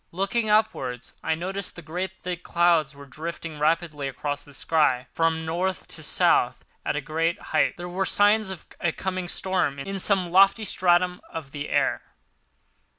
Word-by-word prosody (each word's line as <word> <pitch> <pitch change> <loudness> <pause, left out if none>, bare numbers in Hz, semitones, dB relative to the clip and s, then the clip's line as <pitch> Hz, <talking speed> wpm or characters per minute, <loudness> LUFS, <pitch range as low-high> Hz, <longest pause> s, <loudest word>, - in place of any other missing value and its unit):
Looking 200 +5 0
upwards 135 - 0
I 160 - 0
noticed 190 +4 -4
that 175 - -10
great 180 +3 -4
thick 180 -1 -4
clouds 170 -5 +2
were 140 0 -11
drifting 155 +2 -6
rapidly 155 -2 0
across 145 +2 -4
the 145 - -15
sky 135 -3 +2
from 160 0 +1
North 180 +4 -2
to - - -2
South - - +2 0.2
at - - -1
a 150 - -1
great 165 +3 -1
height. - - +1
There 175 0 -6
were 185 +2 -1
signs 205 0 +4
of 190 -4 -6 0.3
coming 185 -2 -3
storm 180 -6 0
in 195 +8 -4
some 185 -3 +2
lofty 195 +4 +5
stratum 180 -1 +2
of 160 -5 -7
the 145 +1 -5
air. - - +1
170 Hz, 160 wpm, -25 LUFS, 155-190 Hz, 0.3 s, lofty